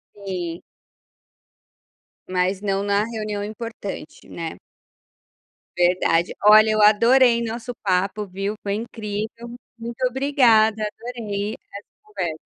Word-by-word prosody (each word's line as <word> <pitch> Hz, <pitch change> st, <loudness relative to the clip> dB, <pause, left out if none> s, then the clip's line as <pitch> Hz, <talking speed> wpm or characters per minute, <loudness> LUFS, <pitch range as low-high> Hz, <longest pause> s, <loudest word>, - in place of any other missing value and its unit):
Sim. 180 Hz, -4 st, -5 dB, 1.7 s
Mas 185 Hz, +1 st, 0 dB
não 195 Hz, -1 st, 0 dB
na 205 Hz, +1 st, +2 dB
reunião 215 Hz, -2 st, -4 dB
importante, 215 Hz, -6 st, -7 dB
né? 165 Hz, -1 st, -6 dB, 1.2 s
Verdade, 175 Hz, -1 st, +2 dB
olha, 215 Hz, +1 st, +8 dB
eu 215 Hz, 0 st, +2 dB
adorei 235 Hz, +3 st, +5 dB
nosso 235 Hz, +2 st, -5 dB
papo, 195 Hz, +2 st, -1 dB
viu, 195 Hz, +3 st, -4 dB
foi 200 Hz, 0 st, -1 dB
incrível, 225 Hz, +1 st, -5 dB, 0.2 s
muito 235 Hz, +2 st, -2 dB
obrigada, 240 Hz, -5 st, +3 dB
adorei 215 Hz, -2 st, -4 dB, 0.2 s
essa 200 Hz, -, -8 dB, 0.2 s
conversa. 180 Hz, -7 st, -4 dB
210 Hz, 100 wpm, -22 LUFS, 195-230 Hz, 1.7 s, olha